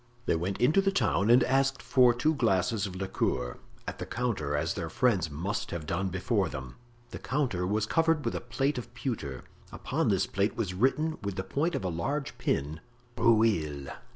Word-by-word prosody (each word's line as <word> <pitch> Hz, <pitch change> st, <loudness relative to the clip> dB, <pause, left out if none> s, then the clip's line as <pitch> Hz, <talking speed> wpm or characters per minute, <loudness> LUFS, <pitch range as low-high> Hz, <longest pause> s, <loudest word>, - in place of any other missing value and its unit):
They -, -, +2 dB
went 90 Hz, +4 st, -2 dB
into 150 Hz, +10 st, +4 dB
the 195 Hz, -, +2 dB
town 110 Hz, -, +1 dB
and 125 Hz, +2 st, +7 dB
asked 135 Hz, 0 st, +2 dB
for 125 Hz, 0 st, +4 dB
two 125 Hz, +7 st, +1 dB
glasses 110 Hz, -, +1 dB
of 95 Hz, -, -8 dB
liqueur, 60 Hz, -9 st, -2 dB, 0.3 s
at -, -, -5 dB
the -, -, -4 dB
counter—as 80 Hz, -11 st, -1 dB
their 80 Hz, -, -4 dB
friends 100 Hz, -5 st, +2 dB
must 90 Hz, +10 st, -3 dB
have 85 Hz, -3 st, -5 dB
done 95 Hz, +5 st, -1 dB
before 95 Hz, 0 st, 0 dB
them. 65 Hz, -4 st, -7 dB, 0.4 s
The -, -, -6 dB
counter 120 Hz, -9 st, -1 dB
was 105 Hz, +2 st, +1 dB
covered 165 Hz, +3 st, +2 dB
with -, -, 0 dB
a -, -, -3 dB
plate 135 Hz, +3 st, -1 dB
of 120 Hz, -, -9 dB
pewter; 70 Hz, -, -4 dB, 0.3 s
upon -, -, -1 dB
this -, -, +2 dB
plate 100 Hz, +4 st, 0 dB
was 100 Hz, -6 st, -1 dB
written 150 Hz, +10 st, +1 dB
with 100 Hz, -2 st, -3 dB
the 95 Hz, -, -2 dB
point 145 Hz, -, -1 dB
of 135 Hz, -, -2 dB
a 95 Hz, -, -1 dB
large 140 Hz, -, -2 dB
pin: 75 Hz, +3 st, -1 dB, 0.4 s
"Rueil... 90 Hz, -12 st, +2 dB
105 Hz, 185 wpm, -29 LUFS, 85-130 Hz, 0.4 s, and